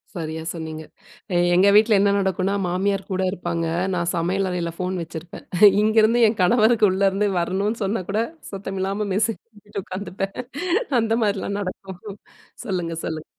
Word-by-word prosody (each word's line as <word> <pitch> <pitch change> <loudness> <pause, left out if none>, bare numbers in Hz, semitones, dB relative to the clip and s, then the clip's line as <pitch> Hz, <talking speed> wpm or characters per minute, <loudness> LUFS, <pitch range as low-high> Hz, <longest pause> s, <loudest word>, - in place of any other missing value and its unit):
சரியா 160 -2 -4
சொன்னீங்க. 160 -2 -6 0.5
எ - - +3 0.2
எங்க 185 +3 +5
வீட்ல 215 0 +6
என்ன 200 0 +3
நடக்குன்னா 190 0 0
மாமியார் 195 +2 0
கூட 190 0 0
இருப்பாங்க. 170 -3 -3 0.3
நான் 170 -1 0
சமையல் 185 +3 0
அறையில 175 -2 -2
ஃபோன் 185 +1 -2
வச்சிருப்பேன். 165 +1 -8 0.4
இங்கேருந்து 220 +2 +4
என் 215 0 -2
கணவருக்கு 220 +2 +4
உள்ள 190 +1 -2
இருந்து 200 +2 0
வரணுனு 195 +6 -1
சொன்னா 195 0 -1
கூட 210 +2 +1 0.3
சத்தம் 195 -1 -5
இல்லாம 200 +2 -1
மெசேஜ் 220 +3 0
பண்ணிட்டு 205 -2 -8
உட்காந்துப்பேன். 195 +1 -5 0.7
அந்தமாரிலாம் 215 -3 0
நடக்கும். 190 -1 -7 0.7
சொல்லுங்க, 180 -6 -2
சொல்லுங்க. 155 -1 -4
195 Hz, 145 wpm, -22 LUFS, 180-210 Hz, 0.7 s, வீட்ல